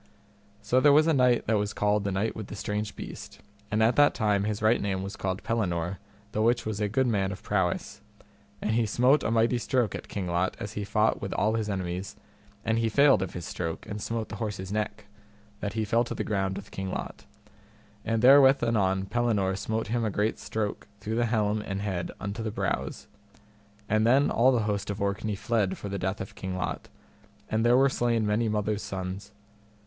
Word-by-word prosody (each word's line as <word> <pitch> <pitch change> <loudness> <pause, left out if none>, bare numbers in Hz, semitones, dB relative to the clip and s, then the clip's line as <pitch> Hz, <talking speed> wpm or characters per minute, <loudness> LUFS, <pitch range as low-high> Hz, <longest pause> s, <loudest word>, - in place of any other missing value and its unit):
So 120 +5 +3
there 145 +2 +6
was 150 +2 +6
a 165 - +3
knight 125 -3 +3
that 110 -1 +2
was 105 0 -2
called 105 0 +1
the 100 - 0
Knight 100 +4 -1
with 110 -3 -6
the - - -7
Strange 105 +1 -3
Beast, - - -9 0.3
and 110 +1 +2
at 115 +2 +3
that 145 0 +5
time 105 -3 +1
his 105 -1 -2
right 110 +2 +4
name 95 -2 -1
was 100 +1 -6
called 95 0 -3
Pellinore, 90 -5 -1 0.3
the 110 - -1
which 120 +2 +2
was 110 -1 -3
a 105 - +1
good 130 +5 +1
man 100 -5 +1
of 95 - -8
prowess, 95 -4 -1 0.6
and 110 - 0
he 115 0 +2
smote 125 +7 +4
a - - -1
mighty 115 +2 +2
stroke 120 -3 0
at - - -6
King 100 -3 -4
Lot 90 +1 0
as 105 -3 -5
he 105 - -3
fought 105 +2 +1
with - - -3
all 110 +1 +1
his 110 -2 -1
enemies, 95 -1 -3 0.5
and 115 0 +1
he 115 -1 +1
failed 140 -2 +5
of 95 - -3
his 85 -2 -5
stroke, 85 -2 -4
and 105 0 -6
smote 115 0 -3
the 100 - -6
horse's 100 -3 -4
neck, 105 0 -3 0.5
that 105 -1 -3
he 110 0 -1
fell 115 +3 +2
to - - -5
the - - -2
ground 95 -2 -1
with 100 0 -9
King 95 -1 -4
Lot. - - -6 0.8
And 115 +1 -1
therewith 135 0 +7
anon 95 -5 +1
Pellinore 105 -4 0
smote 110 +2 -3
him 120 0 0
a 110 - +1
great 105 +2 -1
stroke 110 -1 -3
through 105 +2 -4
the 120 0 +2
helm 110 -2 +1
and 95 -2 -4
head 95 -4 -3
unto 100 +2 -4
the 110 - -2
brows. - - -3 0.8
And 110 +1 +2
then 135 +4 +4
all 125 +3 +4
the 120 -4 +1
host 105 -1 -2
of 100 0 -3
Orkney 100 +1 -1
fled 105 -2 0
for 100 - -6
the 100 0 -3
death 95 +3 -2
of 95 - -7
King 95 -1 -5
Lot, 90 - -4 0.6
and 110 +1 +1
there 120 +1 +5
were 135 +1 +5
slain 120 -4 +1
many 110 +2 +1
mothers' 105 0 -1
sons. 100 0 -5
105 Hz, 215 wpm, -28 LUFS, 100-115 Hz, 0.8 s, therewith